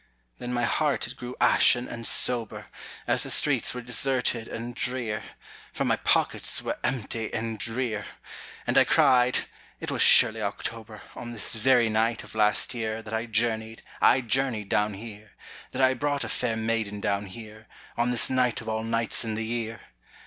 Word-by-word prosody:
Then 125 - -5
my 120 -1 -1
heart 150 +4 0
it 120 - -9
grew 125 -1 -8
ashen 125 +1 +4
and 115 -1 -3
sober, 120 -3 +1 0.4
As - - +2
the - - 0
streets - - +2
were 125 - -6
deserted 125 -2 -1
and 120 +1 -6
drear, 120 -4 -3 0.5
For - - -2
my - - +2
pockets - - +1
were - - -4
empty 115 -2 -3
and 110 -1 -4
drear; 115 -1 -3 0.6
And - - +4
I - - +7
cried: 125 -1 +3 0.3
"It - - -5
was - - 0
surely 110 0 +7
October, 110 +1 -5
On 120 0 -7
this 110 - -1
very 120 +1 +3
night 110 +1 0
of - - -13
last 105 +1 +3
year, 110 -2 -4
That 110 0 -9
I 110 +2 -2
journeyed, 110 0 -1 0.2
I 130 - +5
journeyed 120 -4 0
down 105 +1 0
here, 105 0 -11 0.4
That 135 - -2
I 130 0 +5
brought 145 +1 -1
a - - -5
fair 120 -3 -1
maiden 110 -2 -2
down 100 0 -2
here, 110 +1 -12 0.3
On 120 +1 0
this 125 -1 +2
night 125 -2 +1
of 110 - -11
all 110 0 -2
nights 115 0 0
in 110 -2 -4
the 110 +1 -3
year! 115 0 -4
115 Hz, 180 wpm, -26 LUFS, 110-125 Hz, 0.6 s, I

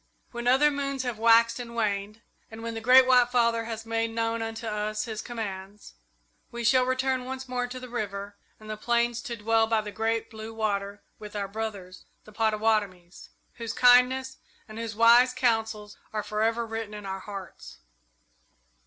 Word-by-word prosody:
"When 240 0 -5
other 275 +4 +5
moons 275 -2 -3
have 245 -4 -4
waxed 230 +1 +5
and 235 -1 -7
waned, 210 0 -2 0.3
and 225 0 -10
when 230 0 -4
the 225 - -5
Great 255 +3 +7
White 250 -1 +5
Father 235 -2 +2
has 225 -1 -6
made 225 0 -1
known 230 0 -2
unto 225 +1 -5
us 215 0 -2
his 220 -2 -5
commands, 205 -3 -7 0.6
we 235 0 -6
shall 255 +2 +4
return 260 0 0
once 265 +1 -6
more 250 -1 -2
to 255 +1 -7
the 255 - -9
river 205 -4 -5 0.2
and 215 - -13
the 215 0 -5
plains 235 +1 0
to 240 - -5
dwell 225 +1 +2
by 225 -1 +2
the 210 -1 -7
Great 225 +1 -2
Blue 220 0 -8
Water 205 -2 -2 0.2
with 210 -1 -10
our 200 -1 -2
brothers, 200 -3 -6 0.2
the 215 - -16
Pottawattomies, 215 -5 -1 0.3
whose 230 -1 -4
kindness 255 +1 +4 0.3
and 215 0 -9
whose 225 -2 -5
wise 240 +3 +6
counsels 225 -4 -1
are 215 -1 -2
forever 220 +3 0
written 225 -1 -5
in 210 -1 -8
our 190 0 -4
hearts." 195 -1 -9
225 Hz, 175 wpm, -27 LUFS, 215-240 Hz, 0.6 s, Great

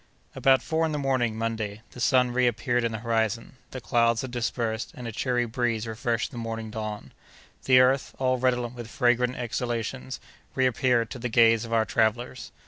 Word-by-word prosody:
About 135 -1 +3
four 160 0 0
in 160 -1 0
the - - -1
morning, 130 -5 0
Monday, 110 -2 -3
the - - -11
sun 125 0 +3
reappeared 120 -1 +1
in 115 - 0
the 110 - -3
horizon; 115 +2 -1
the 130 - -7
clouds 115 +2 +2
had 130 - -6
dispersed, 115 -2 -2
and 125 -2 -7
a - - -4
cheery 120 +2 0
breeze 115 -1 -1
refreshed 115 +1 -2
the 120 - -7
morning 115 -1 -5
dawn. 110 -1 -5 0.5
The 130 -1 +7
earth, 130 +1 +2
all 130 -1 +1
redolent 125 -1 0
with 120 -2 -8
fragrant 125 -1 +2
exhalations, 120 +2 -3 0.4
reappeared 125 -2 +2
to 130 - -6
the 120 +1 -3
gaze 115 -1 +4
of 115 - -9
our 115 -1 +3
travellers. 120 +3 -1
120 Hz, 180 wpm, -26 LUFS, 115-125 Hz, 0.5 s, The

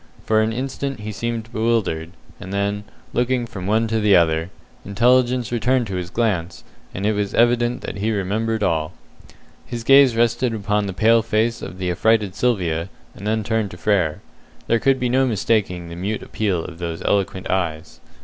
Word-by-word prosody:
For 110 0 +3
an 110 +1 +1
instant 135 0 -4
he 110 +1 -5
seemed 115 +1 -4
bewildered, 110 -8 0 0.3
and 95 -1 -8
then, 100 +1 -1 0.3
looking 125 0 +1
from 95 -5 -7
one 110 +2 +2
to 110 0 +1
the 105 -2 +4
other, 80 -1 +2 0.3
intelligence 120 +4 +2
returned 120 +2 +1
to 100 -3 -5
his 90 -1 -4
glance, 95 -6 -1 0.3
and 95 - -4
it 105 - +3
was 105 -1 -2
evident 120 +1 +2
that - - -6
he 105 +3 -1
remembered 110 +2 -1
all. 80 -4 0 0.7
His 120 -1 -6
gaze 135 -1 +6
rested 120 +1 +1
upon 105 -1 0
the 95 - -4
pale 115 +4 +4
face 115 +1 0
of 90 - -7
the 90 -1 -1
affrighted 105 +1 +2
Sylvia, 90 -7 0 0.2
and 100 - -8
then 110 0 0
turned 110 -1 -1
to 90 - -10
Frere. 90 -5 +1 0.4
There 115 - +2
could 135 +2 +2
be 125 - 0
no 130 +2 +2
mistaking 100 -6 0
the 85 - -7
mute 100 +5 -3
appeal 95 -6 -1
of 85 -1 -9
those 85 -1 -4
eloquent 95 -1 0
eyes. 80 -4 -2
110 Hz, 180 wpm, -21 LUFS, 95-115 Hz, 0.7 s, gaze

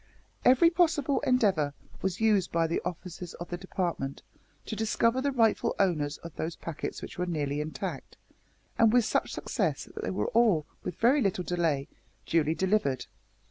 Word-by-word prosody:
Every 260 +7 +6
possible 325 -5 +2
endeavour 200 - +2 0.3
was 190 0 -1
used 210 -5 +3
by 165 -1 +2
the 165 - -1
officers 180 0 -6
of 175 - -8
the - - -1
Department 175 -7 -3 0.4
to 220 - -4
discover 230 +3 +1
the 280 +1 +1
rightful 230 -4 +2
owners 155 -7 +1
of 170 -2 -9
those 165 +1 -3
packets 165 -3 -6
which - - -8
were 180 - 0
nearly 150 -3 -1
intact, 155 +1 -5 0.6
and 225 -1 +6
with 245 -1 +4
such - - 0
success - - -1
that - - -8
they - - -1
were - - -1
all, 220 -10 +3 0.2
with 175 - -4
very 260 +5 +4
little 185 -4 0
delay, 165 -6 0 0.4
duly 160 -1 +2
delivered. 185 - +1
180 Hz, 165 wpm, -29 LUFS, 160-230 Hz, 0.6 s, Every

